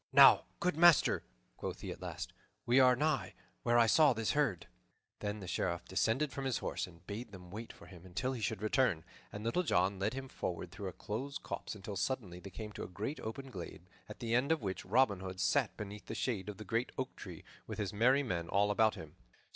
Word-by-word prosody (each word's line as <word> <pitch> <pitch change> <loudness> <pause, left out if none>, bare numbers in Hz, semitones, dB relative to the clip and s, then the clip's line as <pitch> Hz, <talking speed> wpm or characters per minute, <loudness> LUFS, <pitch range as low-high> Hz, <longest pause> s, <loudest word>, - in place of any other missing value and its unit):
"Now, - - +8
good 180 -3 +1
master," 175 -1 +6 0.4
quoth - - -5
he - - -4
at - - -8
last, - - -5 0.3
"we 120 +3 +5
are 125 -1 +7
nigh 130 -10 0 0.3
where 120 0 +3
I 120 - +7
saw 145 +5 +6
this 115 -1 0
herd." 140 - +1 0.5
Then 105 0 -3
the 95 - -7
Sheriff 85 -1 -1
descended 115 +10 +1
from 135 +2 -4
his 130 -3 +1
horse - - -3
and 85 -1 -17
bade 110 +3 -6
them 90 -2 -11
wait 110 +3 -6
for - - -15
him 90 -1 -13
until 100 +9 -2
he 120 - -5
should 110 +1 -2
return; 110 - +2 0.3
and 105 - -6
Little 115 +10 +2
John 95 - +2
led 105 +6 0
him 135 0 -5
forward 90 -7 -4
through 100 +1 -6
a - - -3
close 130 +10 -4
copse - - -5
until 100 0 -6
suddenly 95 -4 -2
they 100 - -9
came 105 +3 -7
to - - -6
a - - -5
great 110 +10 -4
open 130 +4 -6
glade, 90 -3 -7 0.3
at 105 - -8
the 115 -1 -1
end 125 +5 +3
of 160 -7 +1
which 95 -2 -3
Robin 105 -1 +3
Hood 95 0 -6
sat - - +2
beneath 105 0 -7
the - - -4
shade 105 -6 -2
of 105 - -6
the 110 - -8
great 115 +2 0
oak 130 0 -3
tree, - - -9 0.2
with - - -5
his 100 -2 -2
merry 130 +7 +4
men 85 -9 -2
all 100 +1 +3
about 110 +1 +3
him. 80 -2 -10
105 Hz, 225 wpm, -34 LUFS, 95-130 Hz, 0.5 s, Now